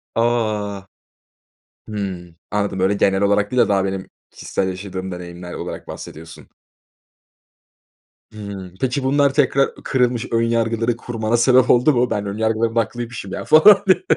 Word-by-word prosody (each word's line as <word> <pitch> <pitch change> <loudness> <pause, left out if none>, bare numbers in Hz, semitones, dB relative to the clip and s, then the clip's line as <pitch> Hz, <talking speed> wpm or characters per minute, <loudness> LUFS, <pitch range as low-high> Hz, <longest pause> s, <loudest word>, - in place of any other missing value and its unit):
A! 110 -4 -1 1.0
Hımm, 95 -5 -6
anladım. 100 -2 -1
Böyle 95 +2 +2
genel 95 -1 +1
olarak 100 0 +2
değil 125 -1 +3
de - - +1
daha 100 -1 +2
benim 95 -1 -4 0.2
kişisel 95 - -3
yaşadığım 95 0 -6
deneyimler 90 0 -8
olarak - - -7
bahsediyorsun. 80 +1 -10 1.8
Hımm, 100 -4 -8
peki 130 +1 -1
bunlar 140 +1 +2
tekrar 140 -1 +2
kırılmış 125 -3 0
ön 115 - +2
yargıları 115 0 0
kurmana 115 -1 -2
sebep 125 +1 +4
oldu 125 +5 +5
mu? 125 -1 +1
Ben, 105 - -2
ön 100 +1 -4
yargılarım 110 +1 0
da - - +4
haklıymışım 115 -2 -4
ya - - -4
falan 200 +6 +7
diye? 185 - +4
110 Hz, 145 wpm, -20 LUFS, 95-120 Hz, 1.8 s, falan